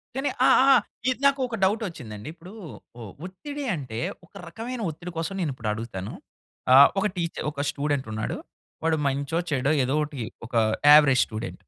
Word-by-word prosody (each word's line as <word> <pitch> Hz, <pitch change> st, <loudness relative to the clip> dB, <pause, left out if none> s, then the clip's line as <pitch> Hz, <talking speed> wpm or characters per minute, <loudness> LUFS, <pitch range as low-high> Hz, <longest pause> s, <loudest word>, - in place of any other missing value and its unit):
కానీ 270 Hz, +2 st, -1 dB, 0.2 s
ఆ! -, -, +6 dB, 0.2 s
ఆ! -, -, +8 dB, 0.3 s
ఇది 255 Hz, -, -1 dB
నాకొక 265 Hz, -4 st, +2 dB
డౌటొచ్చిందండి, 165 Hz, -, -2 dB
ఇప్పుడూ 175 Hz, +4 st, -13 dB, 0.5 s
ఒ -, -, -7 dB, 0.2 s
ఒత్తిడి 285 Hz, +11 st, -7 dB
అంటే, 125 Hz, -7 st, -6 dB, 0.3 s
ఒక -, -, -31 dB
రకమైన 235 Hz, +1 st, -6 dB
ఒత్తిడి 175 Hz, +3 st, -8 dB
కోసం 165 Hz, +4 st, -2 dB
నేనిప్పుడు 130 Hz, -9 st, -3 dB
అడుగుతాను. 105 Hz, -3 st, -6 dB, 0.6 s
ఆహ్, 140 Hz, +1 st, +9 dB
ఒక 195 Hz, -, 0 dB
టీచ 170 Hz, -1 st, -2 dB, 0.2 s
ఒక 140 Hz, 0 st, -3 dB
స్టూడెంటున్నాడు, 135 Hz, -7 st, -2 dB, 0.5 s
వాడు 160 Hz, -1 st, +2 dB
మంచో, 140 Hz, +4 st, -1 dB
చెడో, 140 Hz, +2 st, +1 dB
ఏదో 135 Hz, +3 st, 0 dB
ఒకటి 145 Hz, -2 st, -7 dB, 0.3 s
ఒకా 115 Hz, -1 st, +2 dB, 0.3 s
యావరేజ్ 140 Hz, -4 st, +6 dB
స్టూడెంట్. 110 Hz, +2 st, -6 dB
150 Hz, 150 wpm, -25 LUFS, 125-190 Hz, 0.6 s, ఆహ్